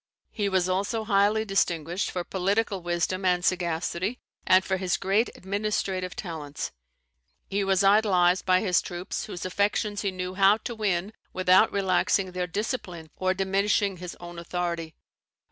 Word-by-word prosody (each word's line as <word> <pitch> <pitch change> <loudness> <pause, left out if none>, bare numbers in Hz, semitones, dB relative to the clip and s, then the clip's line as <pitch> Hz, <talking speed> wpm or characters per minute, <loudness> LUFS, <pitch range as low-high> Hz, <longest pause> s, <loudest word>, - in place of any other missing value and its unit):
He 205 -2 -1
was 185 -2 +1
also 200 +5 -1
highly 210 +1 +2
distinguished 175 -2 0
for 180 - -3
political 195 +2 -1
wisdom 175 +2 -1
and 180 -1 +2
sagacity, 175 +5 -1 0.3
and 185 0 +5
for 190 - 0
his 185 -1 0
great 200 +5 +1
administrative 190 -2 -2
talents. 155 -6 -5 0.8
He 200 +1 -1
was 195 0 +2
idolised 190 -3 +4
by 185 0 +3
his 185 -4 +2
troops, 180 +2 -5
whose 180 -4 -6
affections 205 +2 0
he 200 - 0
knew 185 -1 -4
how 195 +2 +5
to 235 - -6
win 205 -2 -1 0.2
without 185 +3 +4
relaxing 190 -1 +1
their 180 0 -2
discipline 180 - -4
or 185 0 0
diminishing 195 +1 +1
his 180 0 -8
own 175 0 -8
authority. 170 -2 -3
185 Hz, 145 wpm, -26 LUFS, 180-200 Hz, 0.8 s, and